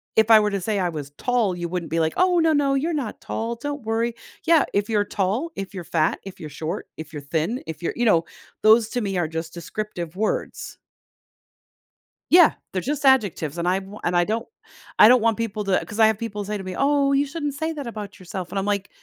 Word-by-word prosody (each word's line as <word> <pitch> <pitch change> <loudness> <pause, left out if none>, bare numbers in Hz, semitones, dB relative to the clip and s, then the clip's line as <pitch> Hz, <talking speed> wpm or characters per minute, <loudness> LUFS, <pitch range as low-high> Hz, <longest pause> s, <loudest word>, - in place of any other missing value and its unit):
if 220 0 +4
I 220 - +10
were 210 -1 +1
to 200 -1 -2
say 210 +3 -1
I 180 -2 +1
was 150 -4 -6
tall, 235 -7 +1
you 175 -1 -3
wouldn't 175 -1 -4
be 165 - +1
like, 160 0 +1
"Oh, 365 -1 +3
no, 325 -1 +3
no. 280 -2 +2
You're 315 +5 0
not 275 -8 -3
tall. 230 +1 -3
Don't 290 +5 -5
worry." 225 +2 0 0.3
Yeah, 330 -3 +5
if 205 +2 0
you're 210 -2 +2
tall, 210 - -1
if 195 0 -6
you're 185 -3 -6
fat, 160 -1 +1
if 195 -1 -10
you're 160 - -6
short, 155 +3 -5
if 160 -1 -8
you're 150 - -5
thin, 165 - -2
if 160 +1 -6
you're - - -1
you 240 - +1
know, 170 -7 +4 0.4
those 220 +1 +6
to 245 - -1
me 195 -3 -2
are 175 -3 +1
just 160 +1 -5
descriptive 175 -1 -5
words. 215 +3 -3 1.5
Yeah. 345 -2 +7 0.2
They're 185 - -1
just 290 +4 -2
adjectives, 200 - +2
and 170 +1 -1
I 185 +2 +2
wa 195 +2 -11
and 175 - 0
I 175 - +4
don't 225 +4 -2 0.5
I - - +10
don't 250 +1 +6
want 225 -1 +2
people 215 -2 -3
to 195 -2 +1
'cause 220 +1 -8
I 220 - +7
have 220 -2 +1
people 210 -3 -4
say 210 +1 -3
to 195 - -7
me, 185 -1 -6
"Oh, 280 0 +3
you 280 +1 +3
shouldn't 290 0 -4
say 315 +3 -2
that 285 -5 -6
about 210 -3 -7
yourself," 185 0 -6
and 195 - -1
I'm 195 - -2
like, 200 -1 -1
210 Hz, 240 wpm, -23 LUFS, 180-245 Hz, 1.5 s, I